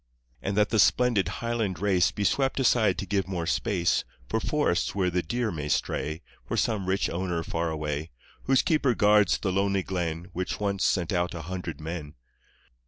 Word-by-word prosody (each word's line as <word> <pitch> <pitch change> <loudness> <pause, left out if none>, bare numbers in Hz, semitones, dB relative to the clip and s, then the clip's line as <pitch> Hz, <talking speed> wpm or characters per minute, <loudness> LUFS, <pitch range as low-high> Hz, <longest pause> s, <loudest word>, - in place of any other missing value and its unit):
And 100 +9 -2
that 105 0 +3
the 110 - +2
splendid 120 -3 +4
Highland 115 -6 -2
race 95 -3 +3
Be 105 - -3
swept 135 +7 +1
aside 115 -6 +3
to - - -3
give 100 -1 -1
more 90 -3 -3
space 90 -1 +1 0.2
For 110 - 0
forests 110 - 0
where 90 -2 +1
the 90 +1 +1
deer 120 +6 -2
may 75 -2 -4
stray 75 +2 -1 0.2
For - - -2
some 105 -5 0
rich 95 +1 +1
owner 85 -1 -2
far 85 0 -2
away, 75 0 -3 0.4
Whose 135 0 +4
keeper 140 -7 +2
guards 105 -1 +4
the 95 - -2
lonely 100 0 +1
glen 85 -2 -3
Which 90 +1 -3
once 100 -2 -1
sent 90 0 +1
out 90 0 0
a 80 - -6
hundred 90 -1 -5
men! 80 -2 -6
95 Hz, 180 wpm, -27 LUFS, 85-105 Hz, 0.4 s, splendid